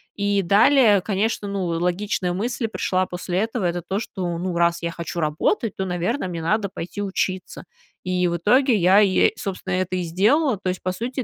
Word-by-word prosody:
И 205 -1 +1
далее, 210 +3 +5
конечно, 205 +2 -1
ну, 195 -3 -2
логичная 180 +2 -1
мысль 230 +4 -2
пришла 185 -3 -1
после 180 0 -4
этого, 225 -1 -2
это 175 0 -1
то, 190 +4 -3
что, 180 -6 -4
ну, 175 0 -3
раз 170 0 +2
я 170 0 -2
хочу 170 0 -5
работать, 180 - 0
то, 190 - -2
наверно, 185 +6 -2
мне 170 -2 -5
надо 205 +5 0
пойти 190 +2 -6
учиться. 190 -2 -3 0.4
И 180 -1 0
в 170 - -1
итоге 245 - +3
я, 190 +1 +5
е 195 -3 +4
собственно, 190 -1 -4
это 185 0 -1
и 180 - -1
сделала. 215 - +2
То 190 - -6
есть, 180 - -4
по 185 - 0
сути, 250 +6 -4
190 Hz, 190 wpm, -22 LUFS, 175-210 Hz, 0.4 s, далее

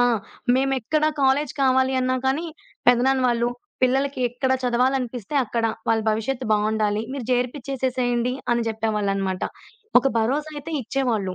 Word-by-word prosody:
ఆ! - - +6 0.5
మేమెక్కడ 270 +3 +1
కాలేజీ 270 +1 +2
కావాలి 260 0 +3
అన్నా 255 0 +1
కానీ 275 +6 +1 0.4
పెదనాన్న 255 +2 +4
వాళ్ళు 240 0 +1 0.3
పిల్లలకి 270 +2 +1
ఎక్కడ 250 +2 -2
చదవాలనిపిస్తే 250 -1 0
అక్కడ 230 0 -1 0.2
వాళ్ళ 225 0 +3
భవిష్యత్తు 240 +4 -2
బావుండాలి. 215 0 +1
మీరు 270 -5 -5
జర్పిచేసేసేయండి 250 -1 -1 0.2
అని 235 -1 +1
చెప్పేవాళ్ళనమాట. 200 -4 -1 0.6
ఒక 270 - +2
భరోసా 290 +7 0
అయితే 300 +3 -6
ఇచ్చేవాళ్ళు. 230 -6 -1
250 Hz, 120 wpm, -23 LUFS, 225-265 Hz, 0.6 s, ఆ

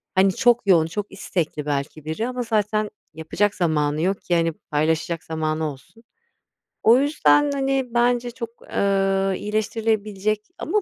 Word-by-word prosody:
Hani, 190 +1 +5
çok 240 -3 +3
yoğun, 170 -5 +5
çok 205 +4 -5
istekli 155 -4 -3
belki 145 +1 -3
biri 160 +9 -2
ama 250 0 -3
zaten 215 -1 0 0.2
yapacak 175 +6 -1
zamanı 150 -3 0
yok 190 +3 0
ki, 175 - 0
hani, 165 0 +2
paylaşacak 160 +2 -1
zamanı 155 -1 -2
olsun. 145 - -16 0.8
O 230 +2 +7
yüzden, 290 0 +3
hani, 270 -1 0
bence 240 0 +2
çok, 235 -1 -6
ııı, 195 -1 +1
iyileştirilebilecek 215 0 -1 0.2
Ama 425 - 0
195 Hz, 140 wpm, -23 LUFS, 160-225 Hz, 0.8 s, O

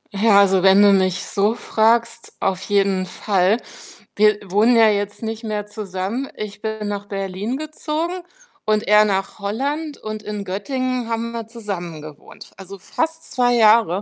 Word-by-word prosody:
Ach 195 - -3
ja, 215 -3 +6
also, 195 -2 +4
wenn 195 +1 +6
du 205 -1 +6
mich 185 -2 +1
so 205 +1 +1
fragst, 230 +1 0
auf 190 -1 -1
jeden 195 -2 +1
Fall. 190 +2 +1 0.6
Wir 210 0 +4
wohnen 215 +6 +4
ja 225 -1 +6
jetzt 205 -1 -2
nicht 225 0 -5
mehr 210 -2 -3
zusammen. 210 +5 -4
Ich 210 -1 -7
bin 220 -1 -4
nach 205 0 -4
Berlin 195 +4 -4
gezogen 310 +2 -3 0.5
und 215 0 0
er 210 +1 +6
nach 195 -1 -2
Holland 280 +9 -3
und 215 0 -7
in 210 -1 -5
Göttingen 250 +5 -3
haben 230 0 -2
wir 230 -2 -5
zusammengewohnt, 175 -10 -8
also 195 +1 -10
fast 320 - -3
2 245 -1 +2
Jahre. 215 -5 +4
210 Hz, 160 wpm, -20 LUFS, 195-230 Hz, 0.6 s, ja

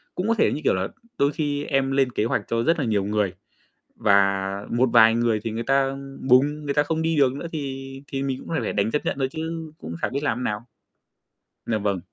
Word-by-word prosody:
cũng 185 +4 -2
có 230 - +3
thể, - - +3
như 150 - -4
kiểu - - +3
là, 95 +1 -1 0.3
đôi 140 +1 +3
khi 145 -2 -2
em 135 -1 +1
lên 135 -2 +2
kế 110 - 0
hoạch - - 0
cho 115 0 0
rất 165 0 +2
là 140 - 0
nhiều 105 -3 +1
người, 105 -3 0 0.6
và 100 -3 +3 0.3
một 125 +2 +2
vài 115 -1 +7
người 115 -2 +1
thì 115 - -2
người 115 +2 -3
ta, 135 +2 +3
ưm, 135 0 -7
bùng, 145 +4 +4
người 140 -1 -1
ta 145 - +4
không 160 +2 -1
đi 165 -1 +1
được 135 -3 +4
nữa, 145 +5 -5
thì 135 -3 -5 0.2
thì 135 0 -3
mình 135 -1 -2
cũng - - -12
phải 165 - -1
phải - - -2
đành 105 +2 +1
chấp 150 - -1
nhận - - -1
thôi 130 -1 +1
chứ 160 0 -5
cũng 85 +1 -7
chả - - +1
biết 140 +2 -2
làm 125 -5 0
thế - - -4
nào. 105 -3 -1 1.1
Dạ 110 - 0
vâng. 100 -3 -1
135 Hz, 250 wpm, -24 LUFS, 110-145 Hz, 1.1 s, vài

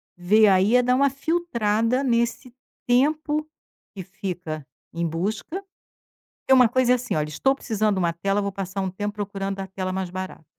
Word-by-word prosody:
ver 210 +5 +4
aí 195 +4 +4
é 250 - +5
dar 250 +1 +2
uma 280 +1 +4
filtrada 255 -6 0
nesse 235 0 0 0.3
tempo 300 +4 +1 0.5
que 190 - -6
fica 180 -6 -6 0.3
em 170 0 -1
busca, 200 - -3 0.8
porque 265 - +3
uma 250 -2 +7
coisa 250 +1 +2
é - - +5
assim 250 -6 -3
"Olha, 150 0 -1
estou 270 - +1
precisando 215 -5 0
de - - -1
uma 170 -2 +1
tela 195 +5 -1
vou 200 0 -2
passar 195 0 -4
um 190 - -1
tempo 205 +2 -4
procurando 195 -1 -4
a 190 - -5
tela 185 -1 -4
mais 190 -1 -3
barato". 185 -2 -7
205 Hz, 180 wpm, -24 LUFS, 185-250 Hz, 0.8 s, uma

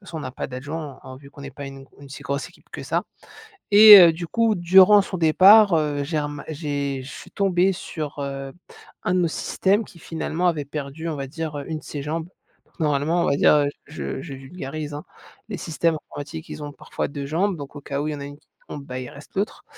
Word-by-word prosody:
façon, 185 -5 -10
on - - -6
n'a 130 -2 -6
pas - - -5
d'adjoint 140 +3 -6
en 130 - -10
en 130 - -9
vu 140 +1 -15
qu'on 140 0 -12
est 140 - -7
pas 140 - -7
u 135 0 -11 0.2
une 140 - -12
si 140 +1 -10
grosse 140 +1 -3
équipe - - -23
que - - -7
ça. - - -1 0.7
Et, 210 0 +11
heu, 170 -2 +8
du 170 +1 -6
coup 230 +3 +1
durant 190 +3 +6
son 195 -1 -4
départ, 190 +5 +6
heu, 150 -3 0
j'ai 155 +2 -2
rema 145 -1 -5
j'ai 145 -3 -3
je 130 - -10
suis - - -11
tombée 190 -1 +2
sur, 155 -4 -6
heu, 135 -1 -5 0.5
un - - +1
de 185 - +2
nos 170 - +2
systèmes 200 +6 0
qui 170 - -16
finalement 165 +2 -2
avait 150 -4 -1
perdu, 145 +3 -6
on 155 - -3
va 135 -1 -4
dire, 160 -1 -5
heu, - - -7
une 160 -1 -4
de - - -15
ses 145 - -6
jambes. 160 +3 -4 0.5
Normalement 155 +2 +1
on - - +1
va 140 - +2
dire - - +5
heu, 145 -1 +2 0.2
je 150 - -5
je 140 -5 -8
vulgarise, 145 +1 -7
hein. 145 +1 -7 0.4
Les 205 - -4
systèmes 165 0 0 0.2
informatiques 155 +3 -8
ils 150 - -7
ont 145 - -6
parfois - - -5
2 140 -1 -6
jambes, 175 +6 0
donc, 140 -1 -9
au 145 - -8
cas 140 0 -4
où 150 - -2
il - - -1
y - - -9
a - - -6
une 145 0 -9
qui - - -37 0.2
tombe, 140 -1 -7
bah, 130 -1 -6
il 125 - -6
reste 145 +4 -14
l'autre. 200 +2 -3
150 Hz, 245 wpm, -23 LUFS, 140-175 Hz, 0.7 s, Et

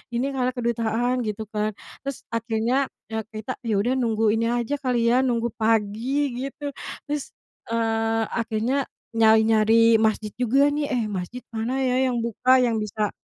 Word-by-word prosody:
ini 270 +4 0
kali, 255 -2 0
kedutaan," 235 +1 0
gitu 215 +1 -3
kan. 215 -1 -1 0.3
Terus 275 -2 -5
akhirnya 230 +4 0 0.2
ya 220 0 -1
kita, 220 +3 -6
ya 215 - +1
udah 205 +5 +1
nunggu 225 -3 +2
ini 225 +1 +1
aja 240 +4 -1
kali 240 -3 +1
ya, 250 - +4
nunggu 235 -2 0
pagi 225 +6 +1 0.2
gitu. 285 +1 -6 0.4
Terus, 295 -2 -3 0.4
eee, 225 0 +1
akhirnya 230 +5 0 0.3
nyari-nyari 225 0 +5
masjid 215 -1 +1
juga 270 +4 +4
nih, 290 0 -1
"Eh 235 - 0
masjid 195 +6 -5
mana 230 +3 -2
ya 260 +1 +2
yang 240 -2 -1
buka 245 +3 +3
yang 235 -2 +1
bisa 210 -1 -1
230 Hz, 155 wpm, -24 LUFS, 220-255 Hz, 0.4 s, nyari-nyari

